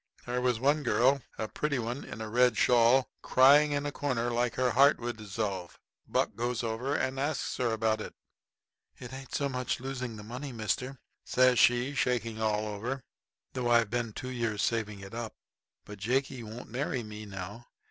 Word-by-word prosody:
There 125 +1 -1
was 125 -2 +1
one 145 +4 +3
girl 130 +2 +3 0.2
a 110 - -2
pretty 145 +4 -1
one 120 +3 -3
in 110 - -8
a 110 - -4
red 120 0 +3
shawl, 125 +2 +4
crying 145 +3 +6
in 145 0 -1
a 145 - -1
corner 125 -4 -1
like 120 0 0
her 125 -1 +2
heart 140 +4 +5
would 120 0 -3
dissolve. 100 -4 -4 0.3
Buck - - 0
goes 120 +1 -2
over 115 +5 -1
and 135 -1 -1
asks 145 +1 -1
her 120 -2 +1
about 110 -1 +1
it. - - -7 0.8
"It 125 0 -9
ain't 135 0 -7
so 140 - +1
much 125 -2 -2
losing 125 -2 -4
the 105 - -9
money, 125 +6 -6
mister," 125 +4 -2 0.3
says 125 -1 +4
she, 120 +3 +4
shaking 115 -4 -1
all 110 -1 +1
over, 120 +6 -4 0.5
"though 125 -2 -1
I've 115 -3 +4
been 120 -2 -1
two 130 +4 -6
years 115 -4 -1
saving 105 -3 -1
it 95 +1 -10
up; 115 -1 -5 0.5
but 105 -1 -10
Jakey 130 +4 0
won't 110 +1 -9
marry 130 -1 -2
me 105 0 -8
now. 100 +4 -7
120 Hz, 185 wpm, -30 LUFS, 110-130 Hz, 0.8 s, crying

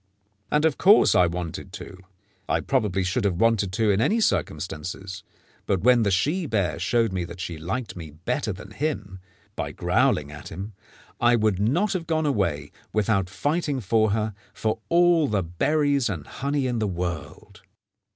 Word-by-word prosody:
And 150 +1 +2
of 160 -4 +1
course 205 +3 +6
I 90 - +5
wanted 85 -1 -5
to. - - -8 0.5
I - - +2
probably 105 -8 0
should 95 +6 -1
have 100 -3 +1
wanted 110 -5 +2
to 110 +1 +2
in 100 +2 +2
any 210 - +2
circumstances, 95 - -2 0.5
but 95 -3 +1
when 125 +2 +5
the 105 - +2
she 150 - +1
bear 95 - 0
showed 115 +5 +1
that 90 -1 -4
she 85 -3 -5
liked 100 +9 -4
me 85 -3 -8
better 100 - -3
than 100 +2 -9
him, 105 -8 -3 0.4
by - - -3
growling 75 -1 +1
at 75 -1 -9
him, 100 +5 -7 0.5
I 120 0 +4
would 105 -4 +1
not 165 - +1
have 170 -4 -3
gone 160 -1 +1
away, 85 - 0 0.2
without 100 -3 +1
fighting 145 - -1
for 110 0 +2
her, 105 +1 -1 0.2
for 110 0 -1
all 170 -2 +4
the 105 -6 0
berries 140 - +1
and 85 -8 -4
honey 140 0 -2
in 120 -2 -1
the 110 - 0
world. 85 -4 -5
105 Hz, 170 wpm, -25 LUFS, 90-135 Hz, 0.5 s, course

